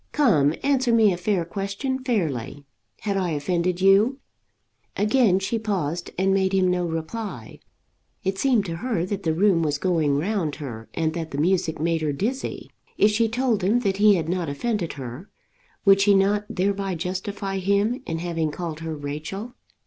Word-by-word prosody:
Come; 165 - +3
answer 270 -3 +2
me 220 -4 +5
a - - -2
fair 180 -1 0
question 200 +9 -3
fairly. 145 - -2 0.4
Had 200 -2 -1
I 185 -2 0
offended 175 +4 -1
you?" 200 +7 +5 0.8
Again 210 -2 +3
she 195 +4 -1
paused 180 -6 -2
and 190 +1 +2
made 190 0 +1
him 185 -1 +3
no 180 -1 0
reply. 165 - -5 0.6
It 190 0 -1
seemed 245 -7 +2
to 165 -3 -4
her 200 -4 -1
that 200 +1 -3
the 160 -4 0
room 185 -1 +3
was 150 -3 0
going 155 -4 +1
round 170 -2 -1
her, 120 -7 -8
and 160 -1 0
that 165 -1 -4
the 140 - -6
music 165 0 +1
made 165 0 0
her 150 -2 0
dizzy. 235 - -3 0.3
If 210 - +5
she 225 +1 +2
told 230 -3 0
him 220 +6 +2
that 195 -4 0
he 210 0 +6
had 165 -3 -2
not 175 -2 -1
offended 185 +4 -2
her 135 - -8 0.6
would 195 0 +6
she 200 0 +5
not 200 +2 +2
thereby 195 0 -1
justify 190 +3 -3
him 200 +6 +1
in 165 - -2
having 165 -2 -2
called 160 0 -5
her 160 -1 -4
Rachel? 155 +11 -6
190 Hz, 175 wpm, -24 LUFS, 160-210 Hz, 0.8 s, he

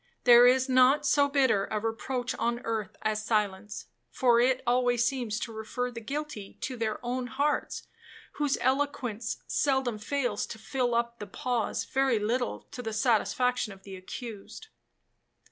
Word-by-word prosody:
There 240 0 +8
is 260 +1 +4
not 260 +3 +4
so 285 0 +4
bitter 260 -8 +2
a 215 - -1
reproach 240 +3 -3
on 235 +1 0
earth 220 -4 -3
as 215 0 0
silence, 210 -2 -1 0.2
for 235 - +3
it 255 +1 +2
always 245 -1 +2
seems 240 -4 -1
to 230 - -4
refer 245 +3 -3
the 230 -1 -7
guilty 275 -4 -6
to 260 - -3
their 220 -2 -2
own 250 +1 -2
hearts, 285 +3 -1 0.5
whose 290 -2 0
eloquence 255 -4 -1
seldom 265 -6 0
fails 245 -2 -1
to - - -7
fill 245 +1 -1
up 235 0 -1
the 210 - -6
pause 240 +3 -2
very 265 -3 +1
little 235 +4 -1
to 250 - -6
the 225 -2 -4
satisfaction 245 +1 +1
of 195 - -17
the 195 -1 -9
accused. 200 +3 -9
240 Hz, 155 wpm, -29 LUFS, 220-260 Hz, 0.5 s, There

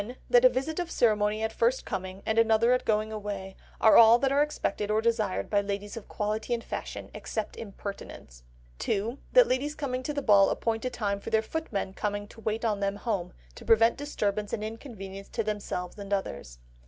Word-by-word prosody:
That 245 0 +6
a - - +10
visit 270 +7 -2
of 350 -1 -2
ceremony 215 -3 +2
at 220 0 -1
first 235 +4 +1
coming, 185 +1 -5
and 220 +1 +2
another 230 +2 +4
at 250 - 0
going 215 0 +1
away, 200 -3 -5 0.2
are 220 - +7
all 230 +1 +9
that 270 +2 +1
are 280 +1 +3
expected 210 -8 -1
or 215 +1 +2
desired 225 -4 0
by 205 -1 +2
ladies 200 0 -4
of 230 - -8
quality 215 +3 -2
and 230 - -6
fashion—except 220 -2 -5
impertinents. 200 - -8 0.4
2. 225 +7 -1
That - - +8
ladies 285 +4 -1
coming 255 -4 -3
to 280 - -3
the 285 -1 -3
ball 200 -4 +6
appoint 225 +1 -1
a - - +1
time 205 -5 -2
for - - -7
their 220 0 +2
footmen 220 -9 -3
coming 205 0 -3
to 225 - -14
wait 220 +1 -2
on 210 -3 0
them 200 0 -1
home, 205 -4 -3 0.2
to - - -12
prevent 225 +1 +5
disturbance 210 -8 -2
and 210 - -2
inconvenience 205 -4 -8
to 230 - -2
themselves 205 -3 -4
and 200 0 -8
others. 70 - -3
215 Hz, 195 wpm, -28 LUFS, 200-235 Hz, 0.4 s, a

